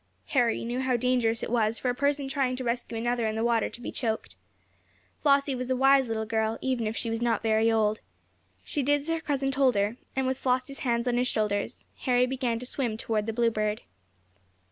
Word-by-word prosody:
Harry 240 Hz, -4 st, +1 dB
knew 240 Hz, +2 st, -2 dB
how 260 Hz, -1 st, +1 dB
dangerous 240 Hz, -2 st, +1 dB
it -, -, -3 dB
was 225 Hz, -2 st, +2 dB
for -, -, -3 dB
a -, -, -2 dB
person 280 Hz, +1 st, 0 dB
trying 270 Hz, -2 st, 0 dB
to 255 Hz, -, -5 dB
rescue 235 Hz, -1 st, -2 dB
another 240 Hz, 0 st, 0 dB
in 215 Hz, -, -2 dB
the 220 Hz, -, -1 dB
water 235 Hz, -1 st, +2 dB
to -, -, -11 dB
be 245 Hz, -, -5 dB
choked. 225 Hz, -3 st, -3 dB, 0.9 s
Flossie 280 Hz, -1 st, +3 dB
was 255 Hz, 0 st, -4 dB
a 260 Hz, -, +2 dB
wise 270 Hz, 0 st, +5 dB
little 220 Hz, -1 st, -2 dB
girl, 220 Hz, 0 st, 0 dB
even 255 Hz, -4 st, -1 dB
if 220 Hz, -, -3 dB
she 230 Hz, -, -1 dB
was 225 Hz, +1 st, -2 dB
not 230 Hz, -2 st, +1 dB
very 220 Hz, 0 st, +3 dB
old. 215 Hz, -1 st, +2 dB, 0.6 s
She 290 Hz, -, -2 dB
did 290 Hz, +2 st, +3 dB
as 290 Hz, +2 st, -3 dB
her 330 Hz, 0 st, 0 dB
cousin 275 Hz, -3 st, -1 dB
told 265 Hz, -3 st, +3 dB
her, 205 Hz, +4 st, 0 dB, 0.2 s
and, 265 Hz, 0 st, 0 dB
with 260 Hz, 0 st, -1 dB
Flossie's 255 Hz, +1 st, -1 dB
hands 235 Hz, -1 st, 0 dB
on 240 Hz, -1 st, +1 dB
his 250 Hz, +1 st, +2 dB
shoulders, 210 Hz, -3 st, -1 dB
Harry 250 Hz, -1 st, +3 dB
began 250 Hz, -2 st, -1 dB
to 245 Hz, -, -7 dB
swim 245 Hz, -4 st, -2 dB
toward 220 Hz, -1 st, -1 dB
the -, -, 0 dB
Bluebird. 215 Hz, -2 st, 0 dB
240 Hz, 215 wpm, -28 LUFS, 225-260 Hz, 0.9 s, wise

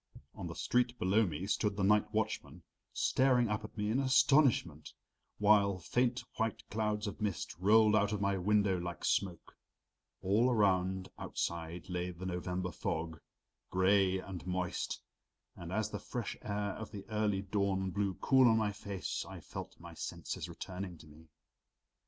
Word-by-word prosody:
On -, -, -6 dB
the -, -, -6 dB
street 125 Hz, 0 st, +1 dB
below 100 Hz, +3 st, +3 dB
me 85 Hz, +3 st, -4 dB
stood 105 Hz, 0 st, 0 dB
the 100 Hz, -, 0 dB
night 105 Hz, +1 st, +3 dB
watchman, 110 Hz, 0 st, -2 dB, 0.3 s
staring 125 Hz, -3 st, +3 dB
up 105 Hz, 0 st, -1 dB
at 110 Hz, -, -10 dB
me 105 Hz, 0 st, 0 dB
in 125 Hz, -, +2 dB
astonishment, 130 Hz, -, +3 dB, 0.4 s
while 100 Hz, -2 st, +4 dB
faint 120 Hz, +7 st, 0 dB
white 115 Hz, -2 st, -2 dB
clouds 105 Hz, 0 st, -1 dB
of 105 Hz, +2 st, -5 dB
mist 105 Hz, -4 st, -2 dB
rolled 105 Hz, +2 st, +5 dB
out 105 Hz, -1 st, +3 dB
of 105 Hz, -, -1 dB
my 100 Hz, 0 st, +1 dB
window 100 Hz, 0 st, +2 dB
like 85 Hz, -2 st, -5 dB
smoke. 90 Hz, -4 st, -1 dB, 0.7 s
All 105 Hz, +7 st, +3 dB
around 95 Hz, -4 st, +2 dB
outside 85 Hz, 0 st, -4 dB
lay 90 Hz, 0 st, -2 dB
the 90 Hz, +1 st, -8 dB
November 90 Hz, 0 st, -3 dB
fog, 80 Hz, 0 st, -3 dB, 0.5 s
gray 95 Hz, 0 st, +3 dB
and 95 Hz, -1 st, -7 dB
moist, 90 Hz, -1 st, -2 dB, 0.6 s
and 85 Hz, 0 st, -8 dB
as 110 Hz, +2 st, -1 dB
the -, -, -4 dB
fresh 120 Hz, -4 st, -4 dB
air 105 Hz, -1 st, -2 dB
of 110 Hz, +2 st, -7 dB
the 100 Hz, -2 st, -8 dB
early 105 Hz, -2 st, 0 dB
dawn 95 Hz, -1 st, 0 dB
blew 100 Hz, -1 st, -1 dB
cool 130 Hz, -2 st, +5 dB
on 110 Hz, -1 st, +5 dB
my 110 Hz, -2 st, +1 dB
face 100 Hz, -2 st, -4 dB
I -, -, -8 dB
felt -, -, -8 dB
my -, -, -10 dB
senses -, -, -5 dB
returning 90 Hz, -1 st, -6 dB
to 80 Hz, -, -15 dB
me. 80 Hz, +2 st, -16 dB
100 Hz, 160 wpm, -33 LUFS, 90-110 Hz, 0.7 s, rolled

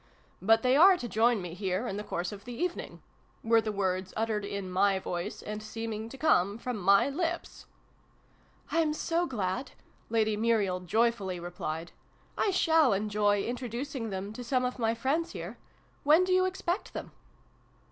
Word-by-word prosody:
" -, -, -35 dB
but 225 Hz, 0 st, +6 dB
they 255 Hz, +1 st, +4 dB
are 365 Hz, +5 st, +8 dB
to 245 Hz, -, -5 dB
join 225 Hz, -2 st, +2 dB
me 175 Hz, -2 st, -6 dB
here 190 Hz, +3 st, -2 dB
in 195 Hz, -, -3 dB
the 210 Hz, -, -4 dB
course 175 Hz, -3 st, -3 dB
of 200 Hz, -1 st, -9 dB
the 245 Hz, -, -6 dB
even 350 Hz, +6 st, -1 dB
ing -, -, -9 dB, 0.2 s
" -, -, -36 dB
were 225 Hz, 0 st, +4 dB
the 215 Hz, 0 st, -2 dB
words, 185 Hz, -2 st, -2 dB
uttered 220 Hz, -1 st, 0 dB
in 200 Hz, -1 st, -4 dB
my 195 Hz, +2 st, +2 dB
voice, 180 Hz, +1 st, -4 dB
and 210 Hz, 0 st, -5 dB
seeming 220 Hz, 0 st, -5 dB
to 270 Hz, -, -10 dB
come 205 Hz, -, +3 dB
from 250 Hz, +1 st, -4 dB
my 200 Hz, +2 st, +4 dB
lips. 335 Hz, +4 st, -3 dB, 0.5 s
" -, -, -30 dB
I'm 320 Hz, -2 st, +2 dB
so 340 Hz, +2 st, 0 dB
glad! 230 Hz, -, -3 dB, 0.2 s
" -, -, -34 dB
Lady 220 Hz, -1 st, +2 dB
Muriel 210 Hz, -4 st, +1 dB
joyfully 200 Hz, -1 st, 0 dB
replied. 170 Hz, -1 st, -5 dB, 0.3 s
" -, -, -34 dB
I -, -, +2 dB
shall 320 Hz, -, +4 dB
enjoy 205 Hz, 0 st, +1 dB
introducing 245 Hz, 0 st, -4 dB
them 195 Hz, +1 st, -5 dB
to 245 Hz, -, -7 dB
some 255 Hz, +1 st, +1 dB
of 250 Hz, +1 st, -3 dB
my 225 Hz, -1 st, +1 dB
friends 280 Hz, +8 st, -1 dB
here! -, -, -7 dB, 0.4 s
When 310 Hz, +5 st, +6 dB
do 370 Hz, 0 st, +1 dB
you 370 Hz, 0 st, +4 dB
expect 370 Hz, +1 st, -2 dB
them -, -, -6 dB
225 Hz, 190 wpm, -30 LUFS, 200-265 Hz, 0.5 s, are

